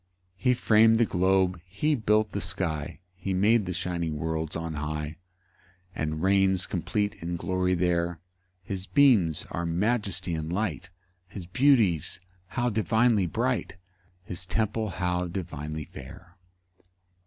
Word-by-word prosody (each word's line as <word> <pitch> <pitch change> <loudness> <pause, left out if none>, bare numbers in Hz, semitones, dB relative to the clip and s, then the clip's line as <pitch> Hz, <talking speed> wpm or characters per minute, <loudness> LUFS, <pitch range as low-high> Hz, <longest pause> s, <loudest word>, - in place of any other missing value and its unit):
3 125 - +1
He - - +6
fram'd 110 -1 +5
the 115 +1 +4
globe, 95 -1 +2
he 100 - -1
built 110 -4 +2
the - - -3
sky, 85 -2 -3
He 95 0 -3
made 105 +2 +3
the - - -1
shining 85 -3 -2
worlds 80 0 -3
on 80 -1 -3
high, 75 +1 -4 0.8
And 80 +1 -3
reigns 95 -1 +3
complete 100 +4 -1
in 85 +1 -3
glory 90 +1 0
there: 85 -1 0 0.4
His 95 0 -4
beams 110 - +4
are 85 - -2
majesty 95 0 -1
and 80 0 -3
light; 90 -2 -2 0.4
His 95 -1 -8
beauties 110 - +3 0.3
how 120 +4 -1
divinely 110 -2 +2
bright! 85 - -1 0.5
His 90 0 -4
temple 110 +1 -1
how 90 0 -1
divinely 80 -4 -5
fair! 90 - -12
90 Hz, 130 wpm, -27 LUFS, 85-105 Hz, 0.8 s, He